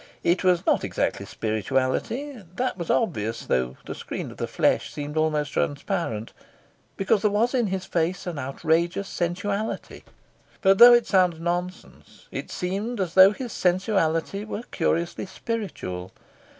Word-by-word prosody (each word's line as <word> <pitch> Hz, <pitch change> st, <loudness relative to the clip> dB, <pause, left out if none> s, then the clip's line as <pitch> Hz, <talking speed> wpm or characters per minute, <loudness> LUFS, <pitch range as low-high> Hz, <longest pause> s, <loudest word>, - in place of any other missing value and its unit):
It 175 Hz, +2 st, +2 dB
was 180 Hz, -2 st, +3 dB
not -, -, +2 dB
exactly -, -, -2 dB
spirituality 135 Hz, -, -2 dB
that 255 Hz, +1 st, -1 dB
was 170 Hz, -3 st, -6 dB
obvious, 115 Hz, -, 0 dB
though 65 Hz, 0 st, 0 dB
the -, -, -5 dB
screen -, -, -6 dB
of -, -, -13 dB
the -, -, -2 dB
flesh -, -, +1 dB
seemed 145 Hz, 0 st, -6 dB
almost 155 Hz, -2 st, +1 dB
transparent, 145 Hz, -, -2 dB, 0.6 s
because 195 Hz, +1 st, +2 dB
there 210 Hz, -, +3 dB
was 225 Hz, +5 st, +1 dB
in 245 Hz, -4 st, +2 dB
his 190 Hz, -1 st, -3 dB
face 175 Hz, +1 st, -1 dB
an 170 Hz, -5 st, -4 dB
outrageous 165 Hz, +8 st, 0 dB
sensuality; 200 Hz, +6 st, -3 dB, 0.6 s
but, 195 Hz, 0 st, +5 dB
though 240 Hz, 0 st, +11 dB
it 240 Hz, -1 st, +2 dB
sounds 180 Hz, -4 st, +3 dB
nonsense, 175 Hz, +2 st, -5 dB
it -, -, -5 dB
seemed 200 Hz, +6 st, -3 dB
as 180 Hz, -4 st, -1 dB
though 190 Hz, +1 st, +8 dB
his 245 Hz, +1 st, -6 dB
sensuality 185 Hz, 0 st, +1 dB
were 215 Hz, +1 st, -5 dB
curiously 170 Hz, +2 st, -1 dB
spiritual. 185 Hz, -, -5 dB
180 Hz, 145 wpm, -25 LUFS, 160-205 Hz, 0.6 s, though